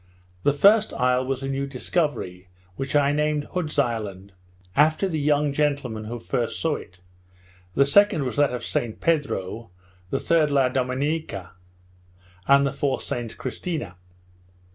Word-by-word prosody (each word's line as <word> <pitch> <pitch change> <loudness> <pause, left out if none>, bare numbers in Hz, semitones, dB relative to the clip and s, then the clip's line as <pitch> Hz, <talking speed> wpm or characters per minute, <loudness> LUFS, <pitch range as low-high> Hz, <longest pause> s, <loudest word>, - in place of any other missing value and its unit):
The 145 - +3
first 205 +9 +4
isle 125 0 +2
was 135 0 -3
a - - -2
new 135 0 -2
discovery, 130 - -2 0.3
which 135 +6 -4
I 145 -1 +4
named 150 0 +1
Hood's 170 -5 -3
Island, 105 -7 -1 0.4
after 155 +6 +3
the 160 -4 -2
young 145 0 +2
gentleman 140 -7 -1
who 120 +2 -5
first 115 0 -2
saw 160 -2 0
it, 90 -2 -14 0.7
the 140 - +5
second 200 +2 +4
was 125 - -3
that 145 -2 +4
of 125 - -4
Saint 115 -2 -2
Pedro, 115 - -1 0.4
the 135 - -1
third 160 -3 +2
La 135 -3 +3
Dominica, 130 - -2 1.0
and 140 0 +6
the 140 - 0
fourth 140 0 -1
St 120 -5 -5
Christina. 135 - -4
140 Hz, 145 wpm, -24 LUFS, 120-150 Hz, 1.0 s, and